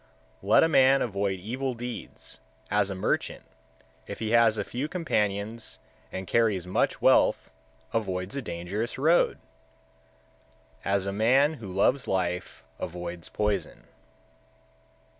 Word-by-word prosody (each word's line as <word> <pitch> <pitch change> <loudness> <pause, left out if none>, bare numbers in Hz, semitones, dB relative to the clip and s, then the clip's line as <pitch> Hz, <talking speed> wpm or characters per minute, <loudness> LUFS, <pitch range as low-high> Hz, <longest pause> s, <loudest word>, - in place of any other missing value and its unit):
123. - - -9
Let - - +7
a - - +5
man 135 -3 +5
avoid 100 -4 -1
evil 125 +6 -3
deeds, 120 0 -7 0.3
as 105 0 +2
a 95 - -4
merchant, 95 - -1 0.6
if - - -6
he 110 -1 -3
has 115 -2 +5
few 120 +7 -3
companions 110 - -2 0.3
and 95 0 -5
carries 105 -5 +1
much 90 - 0
wealth, - - +4 0.4
avoids 95 -1 -2
a 140 - -2
dangerous 100 +4 -4
road; 160 +6 +3 1.5
as 100 -1 0
a 100 - -2
man 130 +8 +4
who 105 - -7
loves 100 +8 +1
life 90 -2 -2 0.2
avoids 85 0 -6
poison. 105 -1 -2
105 Hz, 120 wpm, -27 LUFS, 95-125 Hz, 1.5 s, Let